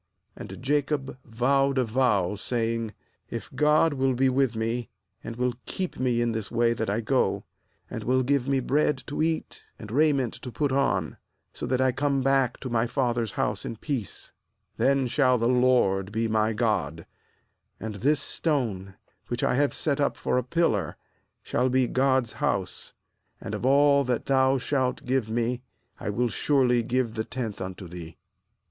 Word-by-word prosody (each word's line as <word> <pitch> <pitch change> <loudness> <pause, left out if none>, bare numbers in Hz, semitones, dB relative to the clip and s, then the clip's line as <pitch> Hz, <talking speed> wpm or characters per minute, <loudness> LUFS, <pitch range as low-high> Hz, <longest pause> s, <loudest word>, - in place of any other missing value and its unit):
20And - - -8
Jacob 140 -1 -1
vowed 135 +4 +1
a 130 - +3
vow, 110 -6 +1
saying: 115 +1 -2 0.3
'If 115 - -6
God 150 +3 +3
will 135 -1 +1
be 130 +2 +3
with 130 -2 +1
me, 115 +2 -2 0.3
and 115 - -6
will 125 0 0
keep 185 -8 -4
me 125 -2 +1
in 120 -1 +1
this 110 -2 -4
way 115 0 +2
that 110 -2 -3
I 105 +3 0
go, 110 - +1 0.4
and - - -6
will 130 +1 +2
give 140 0 +1
me 135 -1 +1
bread 140 0 +1
to 145 - -3
eat, 160 0 -2
and 110 -4 -9
raiment 140 -3 +2
to 125 - -8
put 145 +2 -1
on, 135 +1 0 0.4
that 130 0 0
I 130 0 +3
come 135 +1 0
back 135 -2 +2
to 130 - -4
my 115 0 +1
father's 120 -3 -1
house - - -1
in - - -5
peace, 120 - -4 0.5
then 135 0 +2
shall 130 0 +3
the 115 0 +1
LORD 125 -6 +3
be 115 +1 0
my 110 0 +1
God, 95 -9 -1 0.7
^and 110 -2 -5
this 145 +2 +3 0.2
^stone, 110 - -1 0.3
which 120 0 -3
I - - +2
have 140 +2 +2
set 145 -2 -1
up 140 - +1
for 125 - 0
a - - -3
pillar, 120 - 0 0.5
shall 130 +1 0
be 130 0 +3
God's 130 -2 +1
house; - - -2 0.4
and - - -6
of 125 - -1
all 140 +1 +5
that 125 -2 -1
Thou 135 0 +3
shalt 130 -1 -1
give 125 -3 0
me 120 +2 -1 0.4
I - - -4
will 120 +4 0
surely 125 -1 +2
give 120 0 -1
the 110 -1 -2
tenth 115 -5 -5
unto 95 0 -6
Thee.' 85 -1 -9
125 Hz, 170 wpm, -26 LUFS, 115-135 Hz, 0.7 s, all